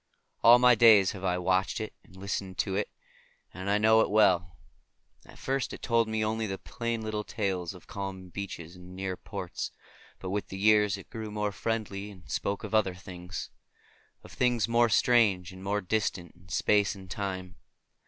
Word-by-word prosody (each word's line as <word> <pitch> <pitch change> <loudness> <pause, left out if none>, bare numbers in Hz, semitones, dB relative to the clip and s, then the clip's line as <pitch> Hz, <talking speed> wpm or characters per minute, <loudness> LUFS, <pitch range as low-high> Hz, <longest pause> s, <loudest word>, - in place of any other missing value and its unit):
All 120 +2 +9
my 125 0 +6
days 110 -4 +6
have 95 -2 -9
I 90 -1 +1
watched 95 +3 +1
it 110 - -5
and 90 - -19
listened 95 -1 -4
to 95 +1 -1
it, 105 - -1 0.6
and 95 +2 -5
I 100 - +3
know 110 +1 +5
it - - +1
well. 90 -4 +3 0.7
At - - -14
first 135 0 -2
it - - -9
told 115 -2 +2
to - - -5
me 110 0 0
only 110 0 -1
the 95 -1 -3
plain 115 0 -4
little 110 -1 -3
tales 95 -5 -3
of 90 - -14
calm 95 -2 -6
beaches 90 -3 -7
and 90 +1 -12
near 95 -1 -3
ports, 95 -3 -6 0.5
but 95 - -6
with 105 +1 -2
the 95 - -7
years 105 0 +4
it 100 - -13
grew 110 -1 -5
more 105 0 -2
friendly 105 0 -3
and 95 -4 -14
spoke 100 0 -2
of - - -6
other 100 -4 +2
things; 90 -1 -8 0.7
of - - -13
things 125 -3 +1
more 120 0 +3
strange 100 -6 +3
and 95 0 -11
more 100 +1 0
distant 95 -3 -2
in 90 +1 -21
space 105 +4 +2
and 95 - -11
in - - -14
time. 95 -1 -4
100 Hz, 195 wpm, -29 LUFS, 95-110 Hz, 0.7 s, All